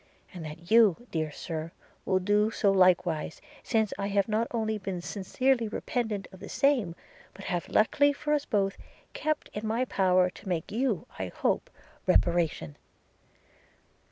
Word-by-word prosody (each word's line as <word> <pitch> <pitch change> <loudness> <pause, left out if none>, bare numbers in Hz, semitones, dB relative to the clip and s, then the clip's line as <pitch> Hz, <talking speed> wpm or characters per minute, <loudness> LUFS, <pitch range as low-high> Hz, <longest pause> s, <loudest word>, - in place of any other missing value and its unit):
– - - -28
and 175 -3 -7
that 160 +4 -9
you, 225 -1 +5
dear 155 -2 -1
Sir, 160 +1 -5 0.3
will 190 - +2
do 205 +3 +2
so 205 -2 +2
likewise, 180 -4 +2 0.2
since 220 -3 0
I 200 - -1
have 200 -1 +1
not 220 +2 0
only 220 -2 -1
been 190 -2 -4
sincerely 230 +7 0
repentant 215 -2 -3
of 190 - -13
the - - -9
same, 245 -12 +2 0.4
but - - -10
have, 175 -1 -2
luckily 285 +6 +4
for 295 +1 -2
us 290 -1 +1
both, 195 -2 0 0.4
kept 310 -1 -2
it - - -3
in 220 - -4
my 230 +4 +1
power 185 -5 +3
to 190 - -10
make 170 -3 -2
you, 230 -4 0
I 95 - -2
hope, - - -1 0.4
reparation. 165 - +1
200 Hz, 160 wpm, -29 LUFS, 175-225 Hz, 0.4 s, you